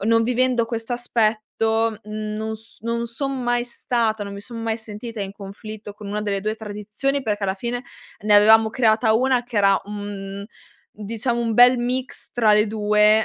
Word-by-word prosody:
non 230 Hz, +2 st, +3 dB
vivendo 250 Hz, 0 st, +2 dB
questo 230 Hz, +1 st, -4 dB
aspetto 225 Hz, -1 st, 0 dB
non 215 Hz, +1 st, -4 dB
s 220 Hz, 0 st, -15 dB
non 235 Hz, +1 st, -2 dB
son 270 Hz, +2 st, -3 dB
mai 240 Hz, 0 st, +1 dB
stata, 230 Hz, -3 st, -1 dB
non 200 Hz, -, -6 dB
mi 200 Hz, -, -7 dB
son 230 Hz, +2 st, -8 dB
mai 225 Hz, -1 st, -1 dB
sentita 220 Hz, 0 st, -7 dB
in 195 Hz, -, -5 dB
conflitto 205 Hz, +1 st, -9 dB
con 210 Hz, -1 st, -10 dB
una 210 Hz, +1 st, -2 dB
delle 200 Hz, -2 st, -1 dB
2 215 Hz, +1 st, -1 dB
tradizioni, 220 Hz, +6 st, -3 dB
perché 210 Hz, -3 st, -1 dB
alla 190 Hz, 0 st, 0 dB
fine 240 Hz, +4 st, -3 dB, 0.4 s
ne 210 Hz, 0 st, +3 dB
avevamo 220 Hz, +2 st, +7 dB
creata 220 Hz, -1 st, +3 dB
1 250 Hz, +1 st, +2 dB
che 240 Hz, -2 st, -8 dB
era 195 Hz, -1 st, +4 dB
un, 200 Hz, -1 st, -6 dB
mhmm, -, -, -7 dB, 0.5 s
diciamo, 230 Hz, +3 st, -2 dB
un 230 Hz, -1 st, 0 dB
bel 245 Hz, +2 st, +7 dB
mix 255 Hz, +3 st, -3 dB
tra 220 Hz, -3 st, +4 dB
le 210 Hz, +1 st, +4 dB
2. 210 Hz, 0 st, +4 dB
220 Hz, 180 wpm, -22 LUFS, 210-235 Hz, 0.5 s, avevamo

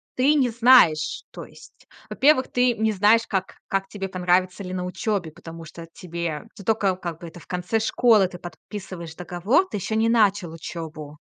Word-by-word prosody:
ты 280 Hz, +4 st, +3 dB
не 260 Hz, -4 st, +2 dB
знаешь 230 Hz, -10 st, +4 dB
то -, -, -9 dB
есть, -, -, -18 dB, 0.2 s
во-первых, 270 Hz, -2 st, +3 dB
ты 250 Hz, -1 st, +2 dB
не 220 Hz, 0 st, +1 dB
знаешь, 215 Hz, +3 st, +3 dB
как 190 Hz, -2 st, -3 dB
как 195 Hz, 0 st, -1 dB
тебе 195 Hz, -2 st, -5 dB
понравится 185 Hz, +1 st, 0 dB
ли 185 Hz, 0 st, -6 dB
на 180 Hz, -1 st, -3 dB
учёбе, 180 Hz, -3 st, -3 dB
потому 165 Hz, +1 st, -11 dB
что 165 Hz, +1 st, -11 dB
тебе 170 Hz, -4 st, -5 dB
ты 200 Hz, -, -11 dB
тока, 200 Hz, -4 st, +1 dB
как 170 Hz, -3 st, -6 dB
бы, 170 Hz, -, -7 dB
это 175 Hz, -, -12 dB
в -, -, -18 dB
конце 180 Hz, +5 st, -1 dB
школы 220 Hz, -3 st, +3 dB
ты 180 Hz, -, -10 dB
подписываешь 175 Hz, -2 st, -9 dB
договор, 180 Hz, -, +1 dB
ты 210 Hz, -, -5 dB
ещё 220 Hz, +3 st, -3 dB
не 225 Hz, +1 st, +2 dB
начал 205 Hz, -7 st, +2 dB
учёбу. 155 Hz, -2 st, -8 dB
185 Hz, 185 wpm, -23 LUFS, 170-220 Hz, 0.2 s, знаешь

